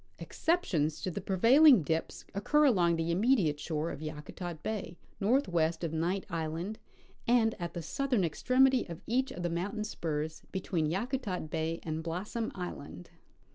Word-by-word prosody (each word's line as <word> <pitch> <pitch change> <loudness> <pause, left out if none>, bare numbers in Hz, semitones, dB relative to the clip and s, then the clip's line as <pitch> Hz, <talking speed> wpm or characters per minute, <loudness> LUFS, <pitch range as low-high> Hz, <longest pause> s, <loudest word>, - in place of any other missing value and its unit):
Exceptions 170 - 0
to 185 - -1
the - - -4
prevailing 240 - +6
dips 160 +2 -2
occur 295 +10 +3
along 175 -10 +4
the 165 +1 -1
immediate 185 - +2
shore 155 +1 -2
of 140 - -7
Yakutat 155 +2 -6
bay, 205 -5 -4 0.2
northwest 175 - +1
of 165 -1 -2
Knight 175 +4 -1
island, 165 +4 -3 0.5
and 230 -2 +4
at 170 0 -5
the 170 - -4
southern 260 - 0
extremity 255 - +3
of 170 - -8
each 260 +4 +1
of 175 - -6
the - - +1
mountain 190 +6 -2
S^urs 155 -6 -3
between 180 -4 -1
Yakutat 195 - -2
bay 165 +1 -1
and 160 0 -3
Blossom 195 +8 -3
island. 145 - -7
175 Hz, 150 wpm, -31 LUFS, 160-225 Hz, 0.5 s, prevailing